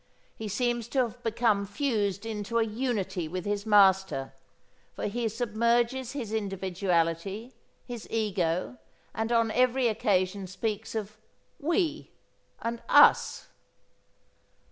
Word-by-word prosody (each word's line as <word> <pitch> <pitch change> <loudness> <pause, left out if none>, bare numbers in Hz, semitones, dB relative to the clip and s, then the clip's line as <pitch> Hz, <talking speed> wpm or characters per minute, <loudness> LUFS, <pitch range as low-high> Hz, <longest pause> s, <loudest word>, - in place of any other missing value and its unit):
He 220 - -6
seems 240 +2 -1
to 265 - -1
have 240 +1 -6
become 225 -3 +1
fused 205 -3 -1
into 220 +1 -3
a 230 - +4
unity 210 -6 -2
with 180 +2 -5
his 205 +1 -2
master, 190 -9 +4 0.6
for - - -4
he 230 +2 -1
submerges 235 +3 0
his 235 -7 -5
individuality, 190 +1 -1 0.3
his 240 -3 -7
ego, 195 -1 -1 0.3
and 225 +1 -2
on 230 -1 +3
every 255 +1 +3
occasion 200 -4 0
speaks 215 +4 -4
of 215 -1 -4 0.4
"we" 325 0 0 0.5
and 230 0 -3
"us." - - +5
220 Hz, 115 wpm, -28 LUFS, 195-235 Hz, 0.6 s, us